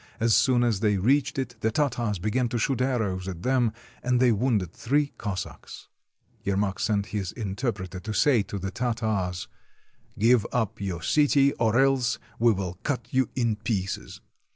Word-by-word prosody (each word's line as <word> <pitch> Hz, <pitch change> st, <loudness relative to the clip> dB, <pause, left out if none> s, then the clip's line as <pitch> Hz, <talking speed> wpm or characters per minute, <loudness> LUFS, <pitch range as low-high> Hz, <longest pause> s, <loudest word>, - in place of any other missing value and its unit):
As 115 Hz, 0 st, +3 dB
soon 125 Hz, 0 st, +4 dB
as 115 Hz, -5 st, +1 dB
they 105 Hz, -2 st, +2 dB
reached 130 Hz, +10 st, +2 dB
it, 125 Hz, -2 st, -3 dB
the 110 Hz, -, +1 dB
Tartars 120 Hz, -5 st, 0 dB
began 110 Hz, +6 st, 0 dB
to 120 Hz, -, -1 dB
shoot 125 Hz, +1 st, 0 dB
arrows 105 Hz, -8 st, -1 dB
at 90 Hz, -2 st, -6 dB
them, 125 Hz, -3 st, +2 dB, 0.3 s
and 125 Hz, 0 st, +1 dB
they 125 Hz, -1 st, +5 dB
wounded 105 Hz, -6 st, 0 dB
three 145 Hz, +3 st, 0 dB
Cossacks. 100 Hz, -3 st, -6 dB, 0.5 s
Yermak 100 Hz, 0 st, 0 dB
sent 100 Hz, -2 st, +1 dB
his 100 Hz, -4 st, -2 dB
interpreter 100 Hz, -4 st, -3 dB
to 105 Hz, +4 st, -6 dB
say 120 Hz, +2 st, +4 dB
to 100 Hz, -, -5 dB
the 95 Hz, 0 st, -4 dB
Tartars: 110 Hz, -8 st, -2 dB, 0.2 s
— -, -, -38 dB
" -, -, -35 dB
Give 115 Hz, +1 st, +4 dB
up 115 Hz, -3 st, -1 dB
your 90 Hz, -4 st, -3 dB
city, 140 Hz, -, +4 dB
or 115 Hz, +1 st, +2 dB
else 130 Hz, -4 st, +2 dB, 0.2 s
we 120 Hz, +1 st, +5 dB
will 95 Hz, -3 st, -3 dB
cut 140 Hz, -3 st, -3 dB
you 130 Hz, 0 st, +2 dB
in 115 Hz, -4 st, +1 dB
pieces." 100 Hz, -4 st, -3 dB
110 Hz, 175 wpm, -26 LUFS, 100-125 Hz, 0.5 s, they